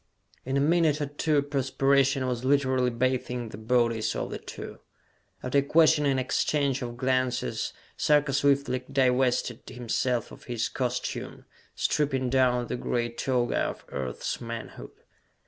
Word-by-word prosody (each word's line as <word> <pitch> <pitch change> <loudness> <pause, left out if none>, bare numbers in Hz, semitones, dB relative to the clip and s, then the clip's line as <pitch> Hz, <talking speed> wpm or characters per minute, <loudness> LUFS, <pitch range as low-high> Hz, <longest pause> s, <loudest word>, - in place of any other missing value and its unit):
In 135 +2 0
a - - +2
minute 155 0 +3
or 145 - 0
two, 145 0 0
perspiration 135 -1 +2
was 125 -1 -2
literally 130 -2 +2
bathing 125 -1 -1
the 105 - -9
bodies 115 -1 +1
of - - -3
the - - -5
two. - - -9 0.6
After 130 +2 +2
a - - +3
questioning 145 -2 +4
exchange 135 +1 0
of 120 -1 -5
glances, 130 -1 0 0.3
Sarka 150 -2 +3
swiftly 140 -2 +2
divested 125 -2 +2
himself 125 0 -1
of - - -13
his 120 -2 -2
costume, 125 -1 -3 0.3
stripping 135 -4 0
down 130 -2 +3
to - - -9
the 125 - -3
gray 120 -1 -1
toga 120 0 0
of - - -3
Earth's 65 -3 -4
manhood. 115 -1 -7
130 Hz, 140 wpm, -27 LUFS, 125-140 Hz, 0.6 s, questioning